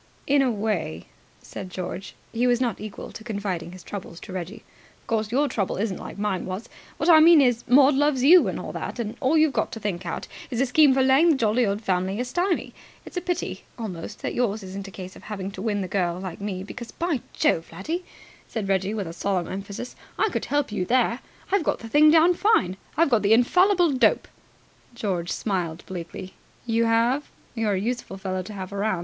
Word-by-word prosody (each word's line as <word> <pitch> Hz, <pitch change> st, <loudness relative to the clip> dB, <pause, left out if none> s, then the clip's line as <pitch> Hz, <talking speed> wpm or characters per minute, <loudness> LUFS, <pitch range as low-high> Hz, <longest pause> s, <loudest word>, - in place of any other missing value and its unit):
"In 280 Hz, 0 st, +4 dB
a 265 Hz, -, +3 dB
way," 205 Hz, -, -2 dB, 0.4 s
said 185 Hz, -, -8 dB
George. 185 Hz, +1 st, -6 dB, 0.2 s
He 240 Hz, +2 st, +2 dB
was 245 Hz, -1 st, +3 dB
not 240 Hz, -6 st, -1 dB
equal 215 Hz, -2 st, -7 dB
to 220 Hz, -, -10 dB
confiding 200 Hz, -6 st, -3 dB
his 185 Hz, -1 st, -11 dB
troubles 185 Hz, -4 st, -7 dB
to 195 Hz, -, -9 dB
Reggie. 185 Hz, +3 st, -6 dB, 0.4 s
"Of -, -, -31 dB
course, 220 Hz, -1 st, -1 dB
your 285 Hz, +4 st, +2 dB
trouble 210 Hz, -7 st, -2 dB
isn't 200 Hz, -1 st, -2 dB
like -, -, -8 dB
mine 200 Hz, -3 st, -2 dB
was. 190 Hz, +5 st, -5 dB, 0.3 s
What 310 Hz, -, -1 dB
I 325 Hz, -3 st, +8 dB
mean 325 Hz, 0 st, +8 dB
is, 245 Hz, -4 st, +3 dB
Maud 275 Hz, +3 st, +6 dB
loves 275 Hz, -2 st, +2 dB
you, 345 Hz, +6 st, +7 dB
and -, -, -3 dB
all -, -, -6 dB
that, -, -, -5 dB
and 225 Hz, -2 st, -3 dB
all 290 Hz, +3 st, +2 dB
you've 310 Hz, -2 st, +4 dB
got 220 Hz, -, 0 dB
to 225 Hz, -, -5 dB
think 195 Hz, -4 st, -3 dB
out 170 Hz, -, -4 dB, 0.2 s
is 240 Hz, -3 st, -3 dB
a 270 Hz, -, +4 dB
scheme 285 Hz, +3 st, +5 dB
for 265 Hz, -, +3 dB
laying 270 Hz, +6 st, +5 dB
the 315 Hz, -, +5 dB
jolly 235 Hz, -1 st, +2 dB
old 200 Hz, +2 st, -2 dB
family 190 Hz, +1 st, 0 dB
a 250 Hz, -, -1 dB
stymie. 350 Hz, +7 st, -1 dB, 0.3 s
It's -, -, -11 dB
a 360 Hz, -, -1 dB
pity 355 Hz, -1 st, -3 dB
almost 205 Hz, -3 st, -6 dB
that -, -, -2 dB
yours 220 Hz, -4 st, 0 dB
isn't 195 Hz, +1 st, -7 dB
a -, -, -7 dB
case 185 Hz, -1 st, -9 dB
of -, -, -13 dB
having 200 Hz, -2 st, -5 dB
to 190 Hz, -, -8 dB
win 205 Hz, -1 st, -1 dB
the 185 Hz, -, -3 dB
girl, 180 Hz, -2 st, -1 dB
like 185 Hz, 0 st, -7 dB
me; 190 Hz, -2 st, -3 dB
because 235 Hz, +3 st, -8 dB
by 330 Hz, -7 st, -1 dB
Jove, 165 Hz, -, +1 dB
laddie," 315 Hz, -, -4 dB, 0.4 s
said 220 Hz, -4 st, -4 dB
Reggie 195 Hz, +2 st, 0 dB
with 180 Hz, -6 st, -4 dB
solemn 185 Hz, -1 st, -1 dB
emphasis, 200 Hz, +5 st, -6 dB, 0.2 s
"I -, -, +2 dB
could -, -, -3 dB
help 290 Hz, -4 st, 0 dB
you 200 Hz, -, -1 dB
there. 240 Hz, +3 st, +2 dB, 0.3 s
I've 400 Hz, -3 st, +3 dB
got -, -, 0 dB
the 230 Hz, -, -9 dB
thing 295 Hz, +6 st, +6 dB
down 330 Hz, +3 st, +6 dB
fine. 335 Hz, -, +2 dB, 0.2 s
I've 325 Hz, -3 st, +3 dB
got 230 Hz, -3 st, +4 dB
the 205 Hz, +2 st, +4 dB
infallible 355 Hz, -, +4 dB
dope." 245 Hz, -5 st, +3 dB, 0.7 s
George 185 Hz, -7 st, -2 dB
smiled 175 Hz, -5 st, -2 dB
bleakly. 185 Hz, +1 st, -7 dB, 0.3 s
"You 230 Hz, 0 st, +2 dB
have? 235 Hz, +5 st, +2 dB, 0.2 s
You're 225 Hz, -3 st, 0 dB
a 190 Hz, -, 0 dB
useful 235 Hz, -2 st, -3 dB
fellow 185 Hz, -1 st, -3 dB
to 190 Hz, +4 st, -8 dB
have 190 Hz, -1 st, -6 dB
around. 200 Hz, -2 st, 0 dB
220 Hz, 215 wpm, -25 LUFS, 190-265 Hz, 0.7 s, I